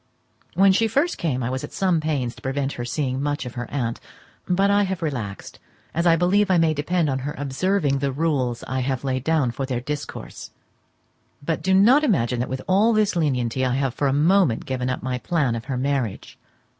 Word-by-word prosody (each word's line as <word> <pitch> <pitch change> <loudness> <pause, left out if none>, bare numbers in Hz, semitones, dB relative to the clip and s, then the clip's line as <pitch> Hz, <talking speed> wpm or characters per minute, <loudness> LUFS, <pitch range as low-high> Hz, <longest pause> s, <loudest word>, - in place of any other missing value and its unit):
When 195 +2 +6
she 225 +4 +3
first 285 +10 0
came 130 -7 -1
I 120 - -2
was 130 0 -3
at - - -7
some 185 -4 +1
pains 140 -6 -1
to - - -16
prevent 135 +1 -2
her 120 - -5
seeing 130 +1 -2
much 145 -2 -2
of 125 - -7
her 120 -1 -5
aunt; 120 -5 -2 0.5
but 195 +2 +2
I 205 0 +4
have 190 -3 -2
relaxed, 120 -10 -5 0.3
as 170 +2 +1
I 165 - +6
believe 190 +4 +2
I 185 - +4
may 165 -1 +3
depend 160 +3 0
on 135 -2 -1
her 145 +3 -5
observing 145 +1 0
the 140 0 -1
rules 135 -5 -1
I 130 0 -3
have 130 0 -2
laid 130 -2 -1
down 155 -5 +1
for 135 +3 -4
their 125 -2 -1
discourse. 145 +4 -6 1.0
But 165 0 -1
do 190 0 +2
not 245 +10 +6
imagine 125 - +1
that 125 - -2
with 130 0 -4
all 205 +5 +4
this 215 -3 +2
lenity 130 -6 0
I 130 -1 +1
have 135 -2 0
for 140 - 0
a - - +2
moment 155 - +3
given 130 -1 -2
up 125 - -3
my 125 -1 -2
plan 140 -5 0
of 115 +1 -5
her 130 -2 -3
marriage. 130 -5 -2
140 Hz, 215 wpm, -23 LUFS, 130-175 Hz, 1.0 s, When